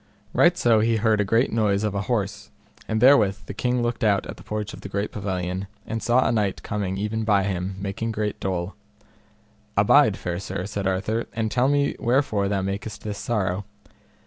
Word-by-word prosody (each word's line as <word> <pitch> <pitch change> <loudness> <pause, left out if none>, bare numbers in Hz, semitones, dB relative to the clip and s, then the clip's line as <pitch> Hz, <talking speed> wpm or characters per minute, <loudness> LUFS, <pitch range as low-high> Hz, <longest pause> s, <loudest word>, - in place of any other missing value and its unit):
Right - - +4
so 115 -2 +4
he 115 +1 +2
heard 110 -1 +2
a - - +3
great 115 +5 +2
noise 105 -2 +2
of 105 -2 0
an 100 - -1
horse, 105 -2 -2 0.4
and 110 - 0
therewith 110 -6 +5
the - - -6
king 125 +3 0
looked 120 +1 -2
out 100 -3 +2
at - - -8
the - - -13
porch 105 0 -4
of - - -10
the 100 - -7
pavilion, 95 -2 -3 0.2
and 110 0 -4
saw 120 +4 +3
a - - +2
knight 105 -4 0
coming 100 -2 -2
even 105 +2 -2
by 105 -3 +3
him, 95 -1 -2
making 100 +3 -3
great 105 -1 -2
dole. 90 0 -2 1.0
Abide, 105 +1 +5
fair 85 -1 -3
sir, 95 -1 -4
said 100 -1 -3
Arthur, 105 +5 -1
and 110 -1 -1
tell 125 +1 +2
me 140 0 +2
wherefore 115 -5 +1
thou 100 -2 0
makest 100 +2 -4
this 105 -1 -4
sorrow. 100 -4 -1
105 Hz, 195 wpm, -24 LUFS, 100-115 Hz, 1.0 s, therewith